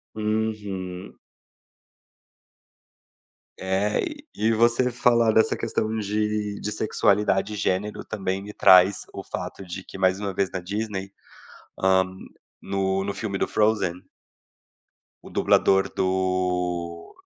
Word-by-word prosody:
Uhum. 105 -4 -3 2.4
É 95 +3 0
e 300 - -5 0.2
e 110 +1 +2
você 120 +3 +3
falar 120 -1 +3
dessa 110 - +3
questão 110 +1 -2
de 105 0 -1
de 105 - -4
sexualidade 105 -1 +1
e - - -4
gênero 105 +1 -1
também 95 -2 -3
me 105 +1 -9
traz 95 0 +5
o - - -7
fato 100 - -6
de 95 +2 -7
que - - -11
mais 95 0 +2
uma 100 -1 -2
vez 95 0 -1
na 95 - -3
Disney, 100 +1 -4 0.7
hã, 95 0 +4 0.6
no 95 0 -1
no 100 0 -3
filme 100 -3 -3
do - - +1
Frozen. 105 -5 +1 1.3
O - - -11
dublador 95 0 +3
do 90 -2 -1
100 Hz, 120 wpm, -24 LUFS, 95-105 Hz, 2.4 s, traz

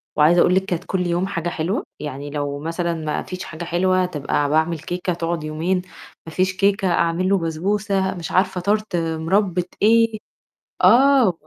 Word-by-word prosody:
وعايزة 160 +3 +5
أقُول 180 - +4
لِك 190 0 +2
كانت 180 -3 -3
كل 180 -2 -1
يوم 175 +2 0
حاجة 175 -3 -3
حلوة، 170 +5 -2 0.2
يعني 145 -1 -6
لو 145 -1 -3
مثلًا 170 +3 -2
ما 155 -2 -3
فيش 185 0 -7
حاجة 160 +2 -7
حلوة 185 +2 +1
تبقى 145 -3 -1
باعمل 160 +2 +1
كيكة 180 +3 -3
تقعد 170 -1 -3
يومين، 165 +5 -1 0.4
ما 160 - -8
فيش 185 +2 +1
كيكة 200 0 +2
أعمل 170 +2 +1
له 200 - +4
بسبوسة 190 +4 -1
مش 170 -2 -6
عارفة 185 -1 +1
Tart 210 +1 0
مُربّة 170 +3 0 0.2
إيه، 225 0 +4 0.6
آه، 265 -2 +6
م - - -2
175 Hz, 175 wpm, -21 LUFS, 160-190 Hz, 0.6 s, آه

